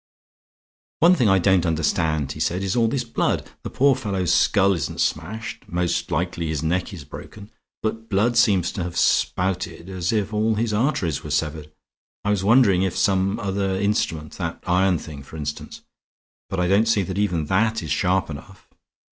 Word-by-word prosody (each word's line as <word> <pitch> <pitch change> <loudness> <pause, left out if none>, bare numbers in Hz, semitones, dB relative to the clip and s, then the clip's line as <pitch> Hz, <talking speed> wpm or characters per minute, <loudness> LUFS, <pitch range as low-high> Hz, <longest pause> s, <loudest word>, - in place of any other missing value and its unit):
"One 170 +3 +7
thing 125 - +3
I 95 - +5
don't 95 -1 +3
understand," 80 -3 0
he 75 - -8
said, 90 +4 -1
"is 95 -1 -1
all 115 -2 +3
this 125 +2 -1
blood. 115 - -1
The - - -6
poor 140 0 +3
fellow's 100 -8 -1
skull 100 0 +4
isn't 85 - -4
smashed; 105 +9 -3
most 85 0 -1
likely 85 -1 -2
his 80 -2 -2
neck 90 +3 -1
is 85 -6 -8
broken; 100 - -11 0.3
but 110 +1 -3
blood 105 +5 +2
seems 100 -6 +3
to 95 - -4
have 85 0 -5
spouted 90 -1 0
as 90 -2 -2
if 110 -1 -1
all 110 +1 +1
his 110 0 -1
arteries 105 - 0
were 75 - -7
severed. 75 0 -2 0.5
I 105 - +2
was 100 -2 0
wondering 105 -4 +5
if 95 -2 -1
some 95 +1 +1
other 95 -1 -1
instrument... 80 -7 -1
that - - -4
iron 90 0 +2
thing, 75 -3 -9
for 70 +4 -11
instance; 75 -1 -6 0.7
but 95 - -3
I 90 - +1
don't 100 +4 +3
see 110 -3 +2
that 95 +1 -4
even 90 -7 0
that 110 +5 +1
is 80 - -5
sharp 90 +1 +1
enough. 95 +7 -11
95 Hz, 180 wpm, -23 LUFS, 85-105 Hz, 0.7 s, One